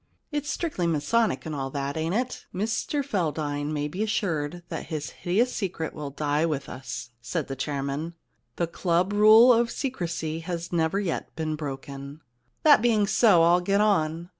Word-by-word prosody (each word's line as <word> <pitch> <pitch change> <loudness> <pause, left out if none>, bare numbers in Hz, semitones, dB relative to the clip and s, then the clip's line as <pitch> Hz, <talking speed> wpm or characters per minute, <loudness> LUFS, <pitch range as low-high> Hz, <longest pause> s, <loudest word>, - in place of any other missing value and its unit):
* - - -44
*It's 295 -1 -2
strictly 285 - -1
masonic 165 - +1
and 160 - -4
all 135 -2 -3
that, 140 0 -3
ain't 160 +3 -1
it?' 250 +2 -3
* - - -43
Mr 225 +8 -1
Feldane 150 - -1
may 150 -1 -1
be 180 +7 -5
assured 175 -6 -1
that - - -5
his 155 -3 -4
hideous 220 +8 0
secret 180 -5 -3
will 150 -2 -5
die 145 +2 0
with 155 -4 -1
us,' 120 -2 -7
said 155 +5 -3
the 135 - -4
chairman. 140 +4 -3 0.2
* - - -47
The 170 - 0
club 175 +3 0
rule 220 +4 +8
of 235 0 +2
secrecy 170 - -3
has 170 +1 -5
never 165 +3 +1
yet 190 -5 -3
been 155 -1 -2
broken.' 140 0 -7 0.2
* 120 - -45
That 295 -7 +7
being 220 -3 +3
so, 200 -4 +5
I'll 175 +2 +5
get 200 +3 +1
on. 170 -5 +1
165 Hz, 185 wpm, -26 LUFS, 150-205 Hz, 0.2 s, rule